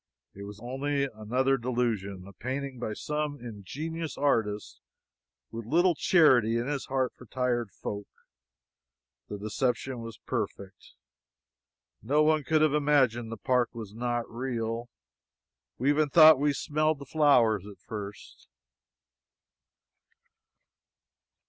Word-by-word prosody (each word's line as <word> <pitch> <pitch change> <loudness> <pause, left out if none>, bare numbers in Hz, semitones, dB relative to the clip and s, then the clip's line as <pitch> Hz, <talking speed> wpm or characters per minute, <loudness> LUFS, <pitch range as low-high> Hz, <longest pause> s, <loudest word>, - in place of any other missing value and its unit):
It 100 +1 -9
was 100 0 -10
only 135 +4 -2
another 130 +2 0
delusion 115 -6 -2
a 100 - -12
painting 130 +4 -5
by 110 -3 -3
some 150 +4 -3
ingenious 145 - -6
artist 110 -7 0 0.7
with 115 +1 -6
little 175 +6 +4
charity 130 - +4
in 120 - -1
his 140 0 -3
heart 130 -1 0
for 125 - -15
tired 120 -3 -1
folk. 100 +2 -6 1.2
The 105 - -5
deception 120 +4 -2
was 115 -1 -8
perfect. 100 -1 -5 1.1
No 145 +8 +2
one 155 -1 +3
could 155 +3 +2
have 155 -2 +3
imagined 130 -6 +2
the 115 - -5
park 125 +1 0
was 110 -3 -7
not 120 +1 -2
real. 115 -1 -3 0.9
We 130 +4 +1
even 150 0 +2
thought 155 -1 +8
we 145 +1 +2
smelled 155 +2 0
the 140 - -10
flowers 125 - +3
at 100 - -11
first. 105 -1 -9
125 Hz, 120 wpm, -28 LUFS, 110-145 Hz, 1.2 s, thought